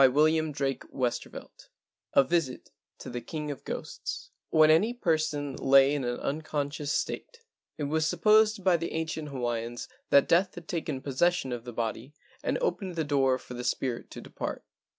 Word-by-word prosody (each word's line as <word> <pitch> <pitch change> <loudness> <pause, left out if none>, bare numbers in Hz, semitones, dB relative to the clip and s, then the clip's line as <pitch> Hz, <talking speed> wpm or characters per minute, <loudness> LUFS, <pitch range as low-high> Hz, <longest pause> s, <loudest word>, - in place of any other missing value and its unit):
100 130 -1 +6
LEGENDS 155 -1 +3
OF 135 -1 -2
GHOSTS 125 -2 +1
XIII - - -8 0.7
A 140 - +8
VISIT 160 -4 -1 0.3
TO - - -8
THE 120 0 -4
KING 150 +4 -4
OF 140 - -8
GHOSTS - - -6 0.2
any 160 +9 +5
person 155 - 0
lay 135 +1 +5
in 145 -2 -1
an 120 0 -2
unconscious 150 0 -1
it 465 - -9
was 155 +2 +1
supposed 215 -1 +4
by 180 -2 +4
the 165 0 -4
ancient 160 -1 -3
aiians 120 -3 -3 0.2
that 140 - +6
death 185 +3 +3
had 175 -2 -10
taken 155 -5 -3
posses¬ 145 +6 +2
sion 135 -7 -4
of 120 -1 -5
the 120 - -6
body 115 +4 -4 0.3
and - - 0
opened 195 - -1
the 160 - 0
door 135 -3 +2
for 125 - -11
the 125 0 -5
spirit 125 -1 -2
to - - -9
depart. - - -5
145 Hz, 170 wpm, -29 LUFS, 130-165 Hz, 0.7 s, A